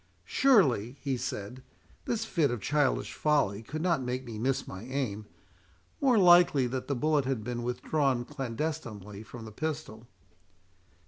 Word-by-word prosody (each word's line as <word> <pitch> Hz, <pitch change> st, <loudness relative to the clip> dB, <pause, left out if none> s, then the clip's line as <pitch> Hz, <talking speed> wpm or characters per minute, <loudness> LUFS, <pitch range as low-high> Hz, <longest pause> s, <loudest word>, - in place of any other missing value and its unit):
"Surely," 140 Hz, -, +3 dB
he 135 Hz, -2 st, -1 dB
said, 120 Hz, +1 st, -5 dB, 0.4 s
"this 225 Hz, -1 st, -1 dB
fit 165 Hz, -9 st, +1 dB
of 120 Hz, -, -2 dB
childish 145 Hz, +6 st, 0 dB
folly 145 Hz, -10 st, +1 dB
could 155 Hz, +8 st, -5 dB
not 170 Hz, -6 st, +2 dB
make 125 Hz, +1 st, -3 dB
me 115 Hz, -3 st, -7 dB
miss 135 Hz, +3 st, 0 dB
my 95 Hz, +3 st, -8 dB
aim—more 100 Hz, -, -3 dB
likely 175 Hz, -7 st, +6 dB
that 125 Hz, +1 st, -3 dB
the 140 Hz, -, 0 dB
bullet 150 Hz, +1 st, +1 dB
had 130 Hz, -5 st, -1 dB
been 120 Hz, +1 st, -3 dB
withdrawn 125 Hz, +1 st, 0 dB
clandestinely 120 Hz, -7 st, -5 dB
from 115 Hz, +1 st, -10 dB
the 110 Hz, -, -9 dB
pistol." 140 Hz, -4 st, -5 dB
130 Hz, 140 wpm, -29 LUFS, 110-150 Hz, 0.4 s, likely